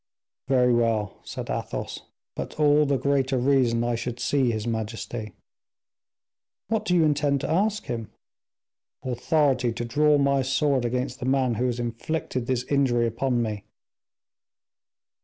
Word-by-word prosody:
"Very 125 -2 +3
well," 115 -4 0
said - - -6
Athos, - - -4 0.3
"but - - -6
all 150 0 +4
the 140 -1 +2
greater 135 0 +1
reason 125 -3 +2
I 120 0 0
should 120 +1 -4
see 130 0 +1
his 110 -2 -2
majesty." 110 -1 -4 1.4
"What 220 -1 0
do 180 - +2
you 170 - +5
intend 145 -2 +1
to 140 - -3
ask 205 +5 +1
him?" 115 -3 -4 0.9
"Authority 130 0 +1
to 120 +1 -4
draw 150 +4 +3
my 140 -1 +2
sword 135 -1 +1
against 125 +1 -2
the 125 - -3
man 130 -2 +2
who 125 +3 0
has 120 -1 -2
inflicted 120 +2 -3
this 125 -2 0
injury 125 -4 +2
upon 120 +1 0
me." 105 -3 -4
130 Hz, 140 wpm, -25 LUFS, 120-140 Hz, 1.4 s, you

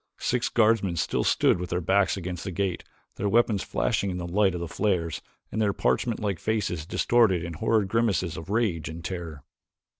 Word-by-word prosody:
Six 125 -1 0
guardsmen 110 -5 +2
still - - 0
stood - - +3
with 90 0 -4
their 90 - 0
backs 95 +3 +2
against 90 -2 -5
the 95 - -4
gate, 95 0 -2 0.3
their 100 - 0
weapons 110 -2 +3
flashing 100 - -1
in 90 - -3
the 90 - -4
light 95 +1 +2
of - - -3
the 85 - -4
flares 85 -3 -1 0.3
and 110 - -1
their 100 -2 +2
parchment 115 +2 0
like 100 -5 -2
faces 95 -8 -2
distorted 105 -5 +3
in 85 0 -5
horrid 110 +4 +1
grimaces 100 -6 0
of 80 +3 -8
rage 105 -8 0
and 80 +1 -8
terror. 85 -6 -6
95 Hz, 190 wpm, -26 LUFS, 85-105 Hz, 0.3 s, stood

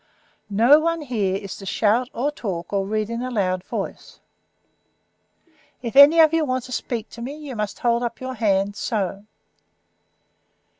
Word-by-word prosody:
"No 235 +9 +5
one 330 +1 -1
here 215 -9 -1
is 195 -1 -6
to 195 - -10
shout 230 +6 +1
or 275 +5 -1
talk, 185 -10 -5
or 195 -1 0
read 215 0 -1
in 230 +1 -3
a 255 - -3
loud 185 -6 -1
voice. - - -6 1.6
If 235 +1 -5
any 285 +4 +8
of 320 -1 +6
you 325 -1 +2
want 255 -3 -1
to 255 - -11
speak 230 -2 -3
to 235 - -10
me 275 +5 -6
you 290 -4 -8
must 210 -2 -3
hold 235 -4 +1
up 235 -1 -4
your 260 0 -5
hand, 200 -4 0
so. 200 -2 -3
235 Hz, 165 wpm, -22 LUFS, 200-260 Hz, 1.6 s, any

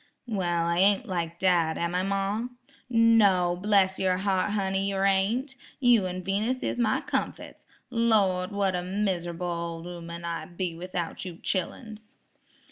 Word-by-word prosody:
"Well, 175 -7 -1
I 170 +1 0
ain't 200 +5 +4
like 170 -4 -3
dad, 175 -3 +2
am 170 0 -2
I, 180 - +1
ma?" 195 +3 -1 0.4
"No, 210 -7 +4
bless 190 0 +2
yer 185 -1 +2
heart, 190 0 0
honey; 195 -1 0
yer 195 0 0
ain't. 215 +8 +1 0.2
You 240 -7 +4
an' 185 0 -5
Venus 215 +7 -1
is - - -2
my 220 -2 +2
comfits. - - -4 0.2
Lawd, 205 -6 +2
what 200 -2 0
a 180 - -1
mis'able 180 -2 -2
ol' 170 -1 -4
'ooman 170 -1 -7
I'd 170 +1 -5
be 180 -3 -2
without 175 0 -5
you 180 -3 -6
chilluns." 215 +5 -4
190 Hz, 150 wpm, -27 LUFS, 175-205 Hz, 0.4 s, ain't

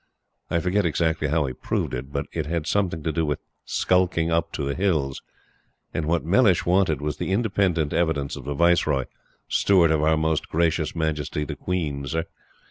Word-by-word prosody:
I - - +1
forget 95 +4 +1
exactly 80 -2 0
how 75 0 +1
he 65 - -3
proved - - -2
it, 65 +2 -5
but 70 +1 -2
it 80 -3 -2
had 85 -1 -2
something 85 -3 0
to 80 - 0
do 80 +1 0
with 75 -2 0 0.3
"skulking 90 -3 +1
up 85 0 +1
to 75 - -3
the 70 0 -1
Hills;" 75 -8 0 0.7
and 75 - -2
what 85 -1 +1
Mellish 95 +1 +4
wanted 90 -5 +2
was 75 0 -2
the - - -3
independent 95 -7 +1
evidence 80 -5 0
of - - -9
the 70 - -3
Viceroy 80 -5 +3 0.4
"Steward 90 -5 +4
of 80 -1 +2
our 80 +1 +3
Most 80 0 0
Gracious 80 -1 0
Majesty 75 -2 -1
the - - -5
Queen, 75 -6 -3
Sir." 80 +2 -1
80 Hz, 185 wpm, -24 LUFS, 75-85 Hz, 0.7 s, Mellish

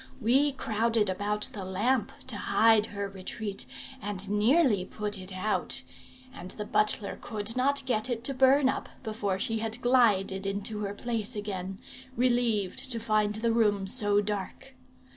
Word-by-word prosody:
We 270 +6 +3
crowded 225 -3 0
about 210 +4 0
the 200 -5 -6
lamp 210 +6 0
to 255 - -1
hide 220 +1 +3
her 200 -1 -4
retreat, 195 +1 -4 0.3
and 200 -1 -3
nearly 220 - +3
put 210 +2 -4
it 185 +1 -8
out; 190 +3 -1 0.5
and 180 -5 -9
the 210 - -5
butler 210 -1 0
could 215 0 -3
not 275 +2 +2
get 245 -1 0
it 235 -2 -2
to 275 - +2
burn 265 +1 +4
up 265 - -2
before 215 -4 -2
she 225 +1 -1
had 225 +1 -2
glided 205 -6 +2
into 205 +2 -3
her 205 -1 -4
place 230 0 -2
again, 195 -2 -5 0.4
relieved 240 -4 +1
to 230 - +1
find 215 -2 +1
the 230 +2 0
room 210 -4 +2
so 205 +1 +4
dark. 205 +6 -5
215 Hz, 155 wpm, -28 LUFS, 200-240 Hz, 0.5 s, burn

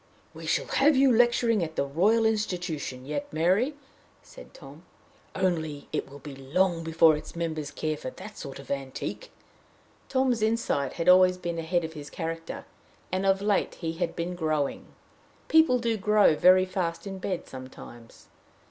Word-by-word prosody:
"We - - -9
shall - - +1
have 290 +2 +3
you 265 0 +5
lecturing 235 -3 +3
at 160 -1 -5
the 140 - 0
Royal 200 +11 +2
Institution 175 -11 -2
yet, 285 - -4
Mary," 190 - +1 0.5
said - - -14
Tom; - - -13 0.5
"only 160 -6 -2
it - - -2
will 140 - -11
be 145 0 -10
long 165 +6 0
before 165 -1 +4
its 150 +2 -9
members 160 -3 -3
care 155 0 -3
for 140 - -6
that 210 +10 -11
sort 135 -2 -8
of 140 -2 -10
antique." 140 - -5 0.8
Tom's 260 -4 +1
insight 220 - 0
had 165 - -4
always 185 0 +6
been 170 -2 -4
ahead 170 +1 0
of 160 0 -5
his 150 -2 -9
character, 165 0 -5 0.5
and 190 +1 0
of 195 +1 +2
late 205 -1 +1
he 165 -2 -4
had 170 0 -3
been 170 +1 -3
growing. 155 -5 -2 0.6
People 320 -5 +5
do 230 -2 -1
grow 210 -4 +4
very 185 +4 +6
fast 185 -2 -3
in 195 -1 -6
bed 185 -1 -4
sometimes. 130 -3 -12
175 Hz, 165 wpm, -27 LUFS, 155-210 Hz, 0.8 s, always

